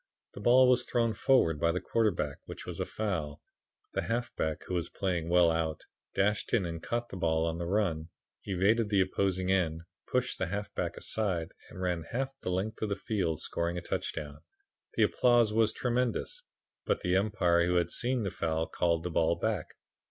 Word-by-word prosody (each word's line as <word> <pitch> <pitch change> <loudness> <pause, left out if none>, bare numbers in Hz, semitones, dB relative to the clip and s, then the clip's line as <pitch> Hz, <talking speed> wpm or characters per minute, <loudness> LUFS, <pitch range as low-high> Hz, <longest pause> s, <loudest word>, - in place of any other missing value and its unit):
The - - -9
ball 125 +4 +6
was 125 -1 +4
thrown 115 -2 +1
forward 100 - +3
by 85 - +3
the 90 - -1
quarterback, 110 -3 0
which - - -8
was - - -6
a - - -1
foul. 85 -9 -3 0.5
The - - 0
halfback, 115 -9 -2
who - - -6
was 85 -2 -1
playing 85 -4 -2
well 85 -1 +5
out, 80 -1 -2 0.3
dashed 100 +1 +1
in 110 -6 +3
and 85 -1 -5
caught 120 +4 -2
the - - -7
ball 80 -2 +1
on 85 0 -2
the 85 - -3
run, 90 -5 0 0.3
evaded 105 +4 +2
the 100 -2 +4
opposing 95 0 0
end, 85 -4 +1 0.3
pushed - - -1
the - - 0
half 100 +3 -4
back - - -3
aside 95 -7 -2 0.2
and - - -10
ran 90 -2 0
half 130 +10 -2
the - - -3
length 95 +4 -2
of 110 - -1
the 100 - 0
field, 90 -6 -1
scoring 85 +1 -1
a - - -3
touchdown. 75 -3 -4 0.6
The - - +4
applause 120 -3 +4
was 110 -1 +3
tremendous. 125 - -1 0.4
But - - 0
the 90 +1 +1
Umpire, 90 -4 +2
who 90 - +1
had 85 -1 +2
seen 125 -1 0
the 100 - -2
foul, 80 0 -1
called 85 -1 0
the 90 - -3
ball 85 +1 +2
back. 100 -2 -2
95 Hz, 190 wpm, -30 LUFS, 85-110 Hz, 0.6 s, ball